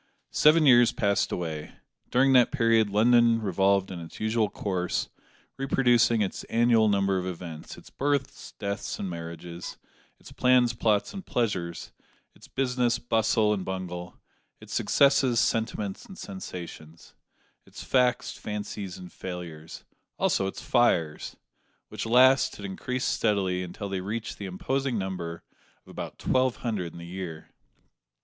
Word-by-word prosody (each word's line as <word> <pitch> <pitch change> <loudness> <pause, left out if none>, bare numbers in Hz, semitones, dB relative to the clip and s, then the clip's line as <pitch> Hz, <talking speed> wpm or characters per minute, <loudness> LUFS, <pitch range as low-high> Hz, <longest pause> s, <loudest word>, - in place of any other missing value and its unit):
Seven 155 +1 +5
years 120 -3 +7
passed 100 -1 0
away. 80 -3 -4 0.4
During 135 +2 +4
that 125 -2 +5
period 115 -5 +3
London 115 +2 +4
revolved 95 -1 +1
in 90 - -6
its 85 -1 -10
usual 110 -1 +1
course, 90 -4 -2 0.5
reproducing 120 -4 +3
its 95 - -4
annual 115 -2 +3
number 100 -1 +2
of 90 - -4
events 85 -3 -7
its - - -15
births, 140 -1 -2
deaths, 100 0 -4
and 100 - -4
marriages; 85 0 -7 0.4
its - - -14
plans, 125 -2 +3
plots, 105 -3 +1
and 195 - -7
pleasures; 95 - -2 0.4
its - - -17
business, 125 -2 0
bustle, 110 -2 +2
and 95 -3 -3
bungle; 90 -2 -6 0.4
its - - -10
successes, 135 -4 +3
sentiments, 110 -3 -1
and 190 - -11
sensations; 85 - -9 0.5
its - - -10
facts, 125 -1 +2
fancies, 105 -2 -5
and 90 -1 -11
failures 85 -4 -8 0.3
also 95 - +1
its 95 - -6
fires; 85 -11 +1 0.5
which - - -5
last 130 +3 +5
had 100 - -8
increased 125 +6 -3
steadily, 95 -4 +1
until 90 +3 -6
they 95 -1 -3
reached 110 +4 -5
the 100 - -5
imposing 130 +7 -2
number 90 -4 -4 0.4
of - - -14
about - - -7
twelve 130 -1 +1
hundred 100 -8 -3
in - - -12
the 85 - -8
year. 85 -3 -7
105 Hz, 140 wpm, -27 LUFS, 90-120 Hz, 0.5 s, years